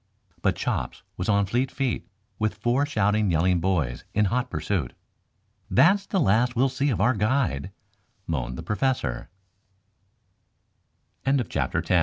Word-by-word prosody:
But - - +2
Chops - - -3
was 90 - -3
on 100 -1 +3
fleet 120 +6 0
feet, 135 -4 -2 0.3
with 110 0 0
four 130 +4 +1
shouting, 105 -4 +1
yelling 90 +2 +2
boys 80 -9 0
in 105 0 +4
hot 125 +1 0
pursuit. 90 - -2 0.8
"That's 175 - +4
the 195 - 0
last 120 - +3
we 120 - +2
shall 135 - +4
see 140 +2 0
of 120 - 0
our 120 +6 +4
guide," 105 - 0 0.6
moaned 65 -6 -3
the - - -6
Professor, 105 - -1 1.9
sitt 135 -3 0
110 Hz, 135 wpm, -25 LUFS, 90-130 Hz, 1.9 s, in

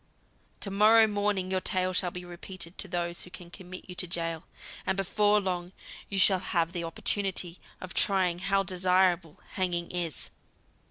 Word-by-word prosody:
To 200 - -2
morrow 215 +3 +7
morning 205 -3 -1
your 185 0 0
tale 185 0 0
shall 180 0 +1
be 180 0 -8
repeated 175 0 -6
to - - +2
those 175 -1 -2
who - - -9
can 175 -1 -10
commit 185 -1 -9
you 180 - -7
to 185 - -1
gaol, 165 -1 -3 0.4
and 190 - 0
before 205 +2 +3
long 180 -2 -3 0.4
you 195 - -2
shall 190 -1 +6
have 170 -3 0
the 175 -2 -3
opportunity 180 +1 -1 0.2
of 185 0 -7
trying 185 -3 +2
how 195 +1 +2
desirable 180 -3 +1
hanging 175 -3 -1
is." 175 -4 -3
185 Hz, 165 wpm, -29 LUFS, 175-195 Hz, 0.4 s, morrow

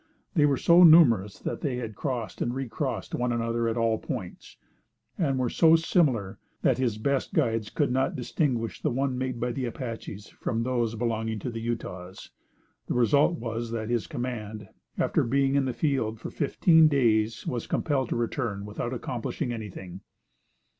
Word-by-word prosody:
They 150 -6 +4
were 140 -2 +2
so 170 +5 +5
numerous 120 - +6
that - - -5
they 125 -4 -2
crossed 120 -1 -4
and 120 +1 -1
recrossed 135 -3 -3
one 125 0 0
another 115 0 0
at 115 +1 -1
all 115 -1 +1
points, - - -7 0.6
and 140 -6 0
were 130 -1 +1
so 160 +6 +5
similar 140 - +1 0.2
that 130 -1 +3
his 120 -5 0
best 135 +4 -1
guides 115 -2 +1
could 145 -4 0
not 130 +1 0
distinguish 125 -3 -1
the 150 - +1
one 130 +1 -1
made 130 -1 -3
by 120 +1 -1
the 130 +1 -3
Apaches 115 -4 -6
from 115 -1 -3
those 120 -2 -1
belonging 110 -1 -2
to 125 - -4
the 115 -1 -5
Utahs. 95 -6 -6 0.6
The - - -2
result 140 +8 +3
was 115 -1 -4
that 110 -1 -4
this 120 -2 0
command, 110 -4 -5 0.3
after - - +1
being 135 +2 +1
in 140 -1 +2
the 130 - -1
field 120 -6 -1
for - - -7
fifteen 160 +2 +4
days, 115 -6 +1
was 120 -3 -3
compelled 135 -6 0
to - - -1
return 115 -4 -2
without 115 +4 -4
accomplishing 120 +2 -3
anything. 95 -4 -8
120 Hz, 165 wpm, -27 LUFS, 110-135 Hz, 0.6 s, numerous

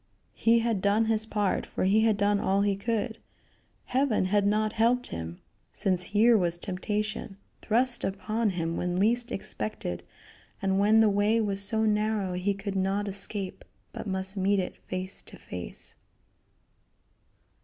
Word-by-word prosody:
He 230 +1 +3
had 225 -4 0
done 205 +3 +3
his 220 0 +1
part, 205 -3 0
for - - -3
he 200 +4 +4
had 220 -2 +3
done 205 0 +2
all 195 +1 +1
he 200 -1 +1
could. 225 +2 -2 0.7
Heaven 255 -6 +1
had 200 +1 +2
not 215 +1 +1
helped 240 +2 +2
him, 85 +1 -6 0.3
since 185 -2 +1
here 225 +4 +4
was 175 -4 +1
temptation 205 +2 -3 0.2
thrust 240 +3 +1
upon 215 +3 -1
him 170 -3 -2
when 180 0 -1
least 235 +5 +2
expected, 210 - -4 0.6
and 195 0 +1
when 215 +2 +5
the 220 - +5
way 205 +3 +2
was 200 -3 -1
so 220 +2 +2
narrow 210 -3 0
he 185 +3 0
could 200 0 -5
not 195 +2 0
escape, 195 0 -3 0.3
but - - -6
must 190 0 +1
meet 195 +1 +2
it 185 - -3
face 185 +1 -1
to - - -14
face. - - -4
205 Hz, 155 wpm, -28 LUFS, 190-220 Hz, 0.7 s, when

